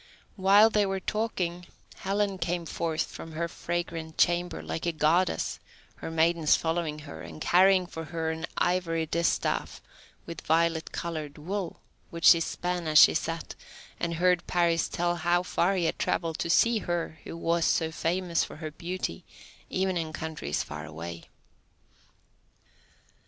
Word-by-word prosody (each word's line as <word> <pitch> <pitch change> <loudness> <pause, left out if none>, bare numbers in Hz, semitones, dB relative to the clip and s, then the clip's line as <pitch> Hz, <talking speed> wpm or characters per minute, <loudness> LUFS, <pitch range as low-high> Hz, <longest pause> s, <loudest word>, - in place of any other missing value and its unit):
While 205 +3 +6
they 210 -2 +2
were 195 0 -1
talking, 180 -4 -2 0.3
Helen 195 0 -1
came 170 0 -2
forth 165 0 -1
from 165 - -10
her 170 +2 -2
fragrant 170 -2 -4
chamber, 175 +1 +1
like 165 - -4
a - - +2
Goddess, 155 - +1 0.4
her - - -6
maidens 165 -1 +3
following 160 -2 -1
her, 80 -1 -9
and 80 -1 -9
carrying 185 +1 +4
for 160 -2 -7
her 160 0 -2
an 160 0 -4
ivory 170 -2 +1
distaff 170 +2 0 0.5
with 170 - -7
violet 165 +1 +1
coloured 155 -4 -5
wool, 180 +3 -4 0.3
which 170 -1 -4
she 170 - +9
span 175 +1 -2
as 155 -1 +3
she - - +9
sat, 165 +1 -3 0.5
and 170 0 -1
heard 180 +1 +2
Paris 170 -2 +2
tell 175 0 0
how 175 +1 +2
far 180 +1 +1
he 180 -3 0
had - - -1
travelled 165 -2 -1
to - - -2
see 230 +6 +4
her 170 -4 -3
who - - -7
was 170 0 +1
so 160 -1 +2
famous 170 +1 0
for - - -7
her 155 0 -6
beauty 170 - -4 0.5
even 190 -1 0
in 160 -2 -3
countries 155 - -3
far 75 +1 -7
away. 85 +2 -8
170 Hz, 150 wpm, -28 LUFS, 160-180 Hz, 0.5 s, she